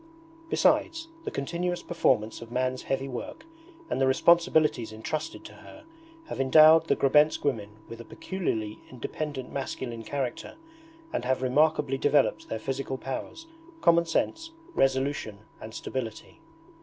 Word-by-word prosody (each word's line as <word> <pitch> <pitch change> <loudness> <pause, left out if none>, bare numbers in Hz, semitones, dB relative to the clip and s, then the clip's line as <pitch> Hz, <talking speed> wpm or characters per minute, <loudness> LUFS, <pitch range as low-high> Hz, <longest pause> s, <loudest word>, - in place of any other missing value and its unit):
Besides, 330 -1 +2 0.2
the - - -1
continuous 175 +5 -3
performance 110 -11 +1
of 115 0 -10
man's 130 +1 -1
heavy 135 0 -2
work 135 - -7 0.4
and 135 - -2
the 135 - +4
responsibilities 155 -4 +3
entrusted 155 - -5
to - - -10
her 305 - -14 0.4
have 135 - -4
endowed 155 +4 +7
the - - +3
Grebensk 150 +3 +3
women 130 -7 -1 0.2
with 115 0 -9
a - - -12
peculiarly 110 - -3
independent 130 +2 -5
masculine 130 -4 -4
character 135 -1 -4 0.6
and - - -1
have 130 +1 0
remarkably 145 0 +2
developed 145 -1 +2
their 110 - -2
physical 135 +3 -3
powers, 135 - -6 0.4
common 170 0 +4
sense, 325 - -1 0.2
resolution, 135 -4 0 0.2
and 110 0 -9
stability. 115 -4 -6
135 Hz, 130 wpm, -27 LUFS, 125-160 Hz, 0.6 s, endowed